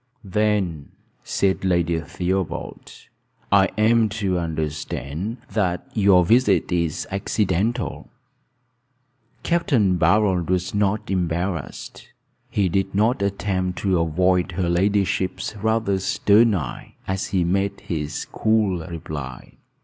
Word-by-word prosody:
"Then," 95 -6 -1 0.3
said 95 -1 0
Lady 85 -3 +1
Theobald, 90 +3 -3 0.6
"I 100 -1 +6
am 110 +1 +4
to 100 -4 -1
understand 80 - -4
that 90 -5 0
your 100 -4 +5
visit 105 -5 +3
is 85 -3 -1
accidental." 105 +3 -1 1.3
Capt. 170 0 0
Barold 95 - +3
was 90 0 0
not 100 0 0
embarrassed. 90 -2 -3 0.4
He 100 -2 +1
did 95 +2 -1
not 110 +2 +2
attempt 95 -2 -1
to 95 -3 +2
avoid 90 +2 +1
her 90 0 -1
ladyship's 95 +1 0
rather 110 -2 0
stern 105 +3 +3
eye, 75 -9 -6
as 95 0 -2
he 95 -3 +1
made 95 +3 -1
his 75 -3 -4
cool 110 -5 +1
reply. 75 -6 -7
95 Hz, 105 wpm, -22 LUFS, 85-105 Hz, 1.3 s, I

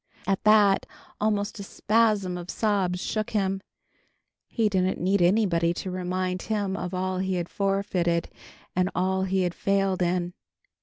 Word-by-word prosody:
At 195 -1 0
that, 210 -2 +5 0.3
almost 205 -1 -1
a - - -5
spasm 210 -3 +1
of 175 +1 -7
sobs 195 -5 0
shook 215 +3 -2
him. 195 -2 0 0.9
He 225 -3 +1
didn't 190 -2 0
need 190 +2 +1
anybody 175 -3 +3
to 185 - -4
remind 185 0 -2
him 205 -3 -2
of 180 0 -4
all 185 0 -1
he 190 0 -1
had 175 -1 -2
forfeited 195 -4 0 0.5
and 185 +1 +2
all 190 +1 +1
he 190 0 +1
had 175 -1 -1
failed 195 -1 0
in. 175 0 0
190 Hz, 150 wpm, -26 LUFS, 180-200 Hz, 0.9 s, that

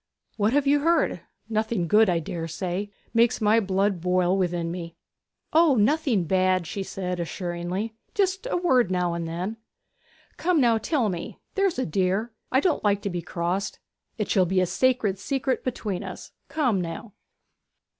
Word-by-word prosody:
'What 215 +2 +1
have 290 0 +3
you 285 +1 +4
heard? 320 - +2 0.3
Nothing 220 -4 -1
good, 215 +3 +5
I 175 - +2
dare 165 0 -4
say. 180 +4 -3 0.2
It - - -36
makes 235 0 +3
my 215 +1 +4
blood 195 -2 0
boil 180 +1 +2
within 175 -3 -1
me!' 170 -1 -6 0.6
'O, 320 -3 +5
nothing 240 - +2
bad,' 185 +1 +2
said 185 0 -4
she - - 0
assuringly. 175 +5 -3 0.2
'Just 390 +3 0
a - - +1
word 260 - +3
now 180 -2 0
and 170 -1 -3
then.' 180 +7 -4 0.8
'Now, 285 -10 +3
come, - - -3
tell 255 -1 0
me, 175 -4 -4 0.2
there's 390 -3 +1
a 255 - 0
dear. 190 +7 0 0.2
I 260 - +4
don't 330 +2 +1
like 205 -1 +2
to 200 - -2
be 175 -1 -3
crossed. 175 +3 -2 0.4
It 210 -3 -1
shall 185 -3 +3
be 190 +1 +2
a 185 - +3
sacred 225 -2 +1
secret 265 +4 -1
between 215 -7 -3
us. - - -8 0.2
Come, 255 -11 +1
now!' 170 +5 -6
200 Hz, 170 wpm, -25 LUFS, 180-250 Hz, 0.8 s, good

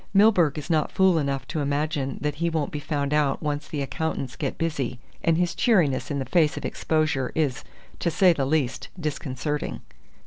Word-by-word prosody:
Milburgh 190 -8 +5
is 150 - -5
not 155 -3 +1
fool 190 -3 +4
enough 140 -2 -2
to 155 - -2
imagine 145 -1 -1
that 150 0 0
he 170 - +2
won't 160 -3 -1
be 150 - -3
found 145 -1 -2
out 150 -1 +1
once 145 -1 -2
the 145 -2 -3
accountants 135 -3 -3
get 140 -4 -3
busy, 135 -7 -2 0.2
and 165 -1 +3
his 175 -1 +1
cheeriness 175 - +2
in 140 -2 -2
face 155 +2 +2
of - - -4
exposure 155 -5 0
is 145 -6 0 0.4
to 170 - +1
say 180 +1 +5
the 140 -4 -1
least 140 -4 0
disconcerting." 150 -1 -3
150 Hz, 180 wpm, -25 LUFS, 140-165 Hz, 0.4 s, Milburgh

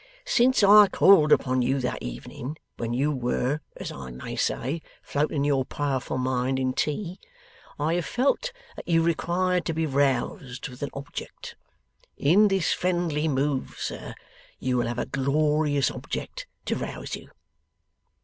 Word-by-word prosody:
Since 260 - +3
I 205 +1 +9
called 175 -6 +5
upon 130 -1 +3
you 135 +3 +1
that 125 - -2
evening 125 - -6 0.2
when 115 0 -3
you 135 +5 +1
were, 130 +2 -1 0.2
as - - -5
I 70 -2 -8
may 65 +1 -7
say, 145 +7 -1 0.2
floating 145 0 0
your 140 -2 +2
powerful 135 -2 -2
mind 130 0 0
in 130 -1 0
tea, 175 +6 -2 0.6
I 150 +3 0
have 175 -1 0
felt 280 - 0 0.2
that - - -9
you 165 -1 +3
required 175 +2 +1
to 165 - -1
be 160 0 +1
roused 135 -1 0
with 125 0 -12
an 145 - -2
object. 140 0 -8 0.6
In 190 +9 +5
this 195 -3 +1
friendly 175 -4 0
move, 140 -1 -1
sir, - - -5 0.4
you 130 -1 -1
will 120 - +1
have 120 - -3
a - - -1
glorious 145 0 +1
object - - -6 0.2
to - - 0
rouse - - -5
you. - - -12
145 Hz, 150 wpm, -26 LUFS, 130-170 Hz, 0.6 s, I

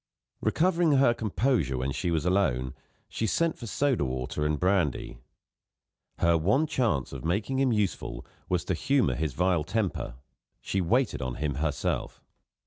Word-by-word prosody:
Recovering 170 -2 +2
her 135 -3 +5
composure 110 - 0
when 65 +2 -1
she 90 +6 -2
was 80 -1 0
alone, 70 -10 +1 0.3
she 110 - -2
sent 165 +5 0
for 120 - -7
soda 135 - +1
water 65 +2 -3
and 75 -1 -1
brandy. 90 -7 0 1.0
Her 85 -1 +3
one 105 - +2
chance 115 - 0
of 65 -2 -7
making 100 +10 0
him 135 -2 +3
useful 105 -4 -2 0.2
was 90 -1 0
to - - 0
humour 135 - +2
his 80 -4 -2
vile 90 0 +1
temper; 95 - -2 0.4
she 95 - -1
waited 120 - +1
on 65 -1 -3
him 75 0 -2
herself. 75 +2 -2
90 Hz, 150 wpm, -28 LUFS, 75-120 Hz, 1.0 s, her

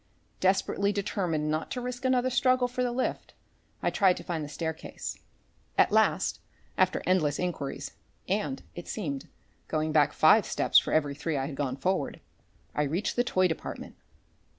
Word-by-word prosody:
Desperately 195 +1 +2
determined 180 -7 -1
not 155 +1 -2
to 250 - -3
risk 250 +1 -5
another 255 0 +2
struggle 255 0 +3
for 250 +1 -3
the 250 -1 +1
lift, 255 +2 -3 0.5
I - - +2
tried 190 -3 +4
to - - -7
find 165 -3 -3
the 145 - -6
staircase. 160 +2 -5 0.6
At - - +5
last, - - +2 0.4
after - - +2
endless 160 -6 +2
enquiries 145 -6 -3 0.4
and 185 -9 -1
it 175 - -8
seemed 145 -10 -4 0.4
going 155 0 -1
back 150 -2 +4
five 180 +8 +5
steps - - +4
for - - -5
every 145 -2 +2
three 145 +1 -2
I 135 - -1
had 140 0 -5
gone 135 -2 -2
forward, 150 0 -1 0.5
I - - 0
reached 160 +8 -1
the 245 - +3
toy 185 -6 +2
department. 160 - -6
175 Hz, 165 wpm, -29 LUFS, 150-210 Hz, 0.6 s, At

